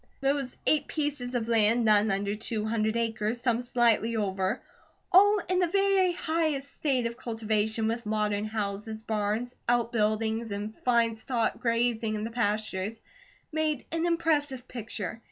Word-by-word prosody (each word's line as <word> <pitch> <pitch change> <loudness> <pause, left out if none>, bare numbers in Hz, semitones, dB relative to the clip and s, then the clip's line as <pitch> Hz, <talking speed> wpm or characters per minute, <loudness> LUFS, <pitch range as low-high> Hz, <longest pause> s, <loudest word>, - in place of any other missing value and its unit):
Those 275 -1 -1
eight 295 -2 +2
pieces 285 -5 -2
of 230 -2 -1
land, 230 +1 +3
none 215 0 +5
under 200 +1 0
two 215 0 -3
hundred 220 0 0
acres, 225 0 -1
some 240 -1 +1
slightly 235 -2 +2
over, 195 0 -1 0.5
all 410 +3 +7
in 365 0 +1
the 360 - +3
very 390 0 +3
highest 315 -5 -1
state 265 -5 0
of 235 0 -3
cultivation, 220 -1 -1
with 230 +1 -2
modern 210 -1 0
houses, 215 0 -4
barns, 220 +3 -1 0.2
outbuildings, 225 -1 +1
and 205 +2 -4
fine 235 -2 +2
stock 230 +1 -1
grazing 230 -2 0
in 210 - -3
the 225 - -4
pastures, 215 -2 -1 0.5
made 310 -3 -1
an 330 +1 0
impressive 295 -6 0
picture. 220 -3 -5
230 Hz, 145 wpm, -28 LUFS, 215-265 Hz, 0.5 s, all